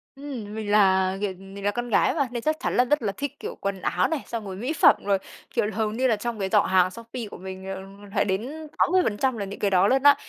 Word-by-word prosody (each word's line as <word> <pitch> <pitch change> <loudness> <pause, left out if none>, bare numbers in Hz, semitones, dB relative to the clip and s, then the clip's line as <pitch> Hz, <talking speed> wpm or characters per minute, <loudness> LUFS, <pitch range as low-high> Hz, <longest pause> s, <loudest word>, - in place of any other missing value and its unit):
Ừm, 255 -7 -7
mình 210 -2 -3
là, 190 -2 +4
kiểu, 200 -2 -1
mình 195 +1 -10
là 205 - +3
con 240 +2 -4
gái 210 - +3
mà. 280 -5 +1
Nên 240 -1 -3
chắc 310 0 0
chắn - - -1
là 250 - +5
rất 295 +1 +2
là 205 - 0
thích, 285 -2 -4
kiểu, - - -6
quần 195 -2 -2
áo 180 +1 +1
này, 320 -4 -2
xong 225 -3 -4
rồi 190 -1 -6
mỹ 250 +10 -2
phẩm, - - +6
rồi, 200 -1 +3 0.4
kiểu, - - +2
hầu 215 -1 0
như 255 +4 +1
là 230 - +3
trong 225 +1 -4
cái 190 -1 -1
giỏ - - +5
hàng 185 -1 +3
Shopee 230 +2 -7
của - - -8
mình, 190 0 -8
ờ, 190 - -6 0.3
phải 200 - +3
đến 260 +12 -3
80% 260 - +2
là 200 - -3
những 195 - -8
cái 200 - +1
đó 185 +1 +5
luôn 265 +3 +2
á. 285 0 +8
215 Hz, 270 wpm, -25 LUFS, 195-255 Hz, 0.4 s, á